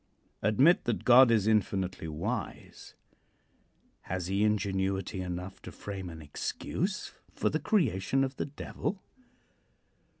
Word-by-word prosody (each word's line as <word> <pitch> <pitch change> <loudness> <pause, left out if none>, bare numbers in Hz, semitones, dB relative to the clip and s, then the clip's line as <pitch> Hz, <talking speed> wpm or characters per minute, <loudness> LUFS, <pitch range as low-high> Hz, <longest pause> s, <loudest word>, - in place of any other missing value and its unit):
Admit 135 - +4
that 120 - -1
God 125 +1 +8
is 110 -4 +3
infinitely 95 -5 0
wise. 75 0 -5 1.1
Has 90 -1 -2
he 100 +3 +1
ingenuity 95 -2 0
enough 90 +1 -5
to - - -9
frame 95 -3 -6
an 80 -2 -9
excuse 185 - -3 0.2
for - - +1
the - - 0
creation 135 - +1
of 135 0 -3
the - - -1
Devil? 170 +6 -4
100 Hz, 120 wpm, -30 LUFS, 95-125 Hz, 1.1 s, God